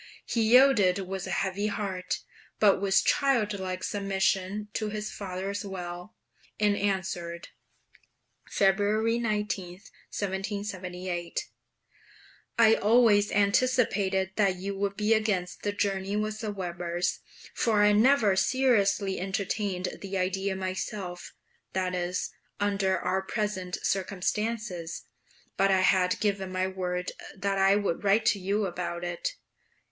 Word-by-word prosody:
He 230 - 0
yielded 225 -5 +5
with 190 0 -4
a - - -5
heavy 200 +2 -1
heart 190 -3 -3 0.4
but 200 -2 +4
with 195 -1 +3
childlike 205 -9 +1
submission 195 0 -1
to 215 -1 -2
his 210 0 -4
father's 195 +1 -4
will, 180 0 -7 0.4
and 210 -1 +3
answered 185 -4 -2 1.0
(February 210 +4 +2
19, 210 -5 -2
1778) 185 -2 -5 1.1
I 225 -1 +7
always 215 -2 +4
anticipated 200 -3 +2
that 195 -3 +3
you 195 +2 -4
would 200 0 -2
be 215 +1 +3
against 205 -5 0
the 205 - -1
journey 200 -1 -1
with 215 +1 -2
the 215 -2 -3
Webers, 175 -2 -2 0.3
for 215 -3 +2
I 210 - +6
never 220 -2 +4
seriously 200 -3 +2
entertained 190 0 -2
the 195 0 -4
idea 190 +1 -1
myself; 185 -1 -5 0.4
that 185 -1 -1
is, 180 0 -2 0.3
under 195 -2 +1
our 185 +1 0
present 190 -3 -3
circumstances; 195 -2 -2 0.5
but 195 0 +3
I 190 -1 +4
had 185 -1 +3
given 200 -3 -1
my 185 0 0
word 180 -1 -3 0.3
that 195 0 -1
I 195 +1 +5
would 205 -4 -1
write 205 +2 +3
to 205 - +3
you 200 +3 0
about 175 -1 -4
it. 175 -1 -3
195 Hz, 120 wpm, -28 LUFS, 185-210 Hz, 1.1 s, I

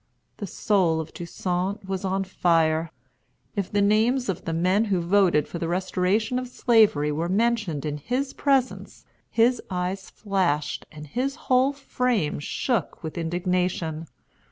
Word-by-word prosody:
The 205 - -5
soul 180 -4 +1
of 160 - -6
Toussaint 180 +3 -3
was 190 0 -3
on 195 0 0
fire. 165 -3 +2 0.7
If 200 -3 -2
the 205 -1 +2
names 225 +4 +2
of 185 - -3
the 165 - -2
men 185 +6 +2
who 195 -4 +1
voted 175 -3 +3
for 170 - -6
the 165 - -2
restoration 190 +6 0
of 255 - -5
Slavery 215 - +3
were 165 +4 -2
mentioned 210 -7 0
in 150 -1 -2
his 255 - -2
presence, 270 -3 0 0.2
his 235 +2 +3
eyes 185 +1 -3
flashed 175 -8 -1
and 150 0 -9
his 255 - -2
whole 260 -2 +2
frame 250 - -1
shook 205 - -2
with 160 - -5
indignation. 175 -1 -1
190 Hz, 145 wpm, -25 LUFS, 165-225 Hz, 0.7 s, voted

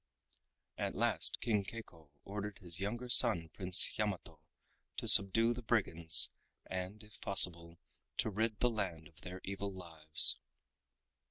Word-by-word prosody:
At - - -5
last - - -3
King 105 -4 -2
Keiko 90 -8 -14
ordered 100 0 -9
his 85 -3 -5
younger 120 +5 -7
son 110 -9 +3
Prince 95 +1 +2
Yamato 105 -4 -6 0.6
to - - -7
subdue 115 +4 +5
the 125 - -10
brigands 85 -9 0 0.3
and, 95 +3 -9
if 105 0 -20
possible, 85 -3 +1 0.4
to 110 - -3
rid 110 +1 -5
the 125 - 0
land 90 -8 -7
of 85 +4 -24
their 90 0 -11
evil 100 +1 -8
lives. 80 -4 +5
100 Hz, 135 wpm, -32 LUFS, 85-110 Hz, 0.6 s, subdue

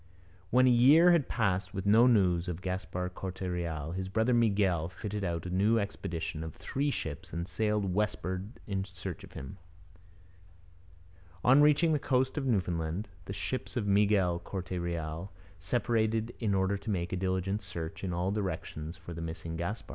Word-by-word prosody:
When 125 +4 +5
a 130 - +6
year 145 +9 +7
had 165 -6 +3
passed 100 -3 0
with 95 0 -3
no 110 +4 +6
news 95 -7 +3
of 90 +1 -4
Gaspar 90 -1 -3
Corte 95 0 -7
Real, 85 -4 -3
his 95 +1 -4
brother 110 +5 +2
Miguel 100 -8 +2
fitted 105 +2 -5
out 85 -2 -2
a 90 - -4
new 105 +5 +3
expedition 85 -6 -3
of 80 -2 -7
three 140 +2 -1
ships 80 - -5
and 85 +1 -3
sailed 105 -1 0
westward 95 +1 -2
in 95 -2 -2
search 95 -2 -7
of - - -13
him. 65 +8 -8 1.8
On 130 +4 +7
reaching 150 +2 +5
the 150 - +2
coast 130 -1 +1
of 140 -3 -1
Newfoundland, 90 -3 -1 0.2
the 100 - -5
ships 130 +6 -4
of 110 - 0
Miguel 100 -3 +3
Corte 90 +1 -6
Real 85 0 -3 0.3
separated 115 +3 0
in 105 -4 +1
order 95 +1 +1
to 110 - -7
make 90 -3 -1
a - - +2
diligent 95 +2 -1
search 85 -4 -6
in 95 - -2
all 90 +2 0
directions 85 -4 -4
for 85 -1 -9
the 85 - -6
missing 80 0 -5
Gaspar. 85 +7 -4
95 Hz, 170 wpm, -31 LUFS, 85-110 Hz, 1.8 s, year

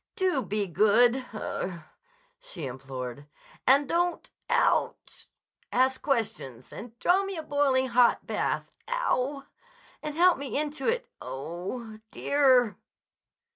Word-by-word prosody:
"Do 370 -8 +1
be 205 -1 -2
good—ugh!" 215 -2 +1 0.6
she 175 - -7
implored. 130 +1 -7 0.4
"And 275 +2 +5
don't—ooch!—ask 265 -5 -1
questions—and 225 - -3
draw 370 +9 +3
me 390 -2 -5
a 320 - -4
boiling 275 -3 +1
hot 240 0 +4
bath—ow - - -2
w - - +5 0.3
w!—and 485 - -12
help 355 -3 +5
me 280 -1 -3
into 295 -2 -2
it—oh 180 - -4
h 230 - -10 0.3
h - - -9
h—_dear! 260 -6 +4
260 Hz, 100 wpm, -28 LUFS, 200-305 Hz, 0.6 s, And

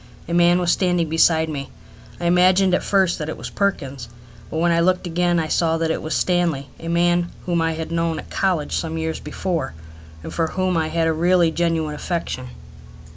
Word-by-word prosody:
A 170 - -4
man 175 0 +5
was 175 -1 +2
standing 180 -3 +1
beside 160 0 +3
me. 140 -3 -5 0.5
I - - -4
imagined 185 +2 +4
at - - +2
first 190 -3 +1
that 150 0 -4
it - - -5
was - - -7
Perkins, 140 - -2 0.4
but - - -4
when 170 +1 +2
I 170 - +3
looked 185 +2 +2
again 175 0 +1
I 160 - -1
saw 165 +1 +1
that 165 0 0
it - - -2
was 155 - -3
Stanley, 170 -6 0
a 165 - -8
man 175 +1 +2 0.2
whom 170 -2 0
I 165 0 +1
had 160 0 -5
known 165 -1 0
at - - -9
college 180 -6 0
some 160 -1 -2
years 160 0 -3
before, 170 - -3 0.5
and - - -7
for 165 -1 0
whom 185 +1 -1
I 160 -1 +1
had 165 0 0
a 160 - +2
really 170 +1 +3
genuine 165 -2 0
affection. 150 -5 -4
170 Hz, 205 wpm, -21 LUFS, 160-175 Hz, 0.5 s, man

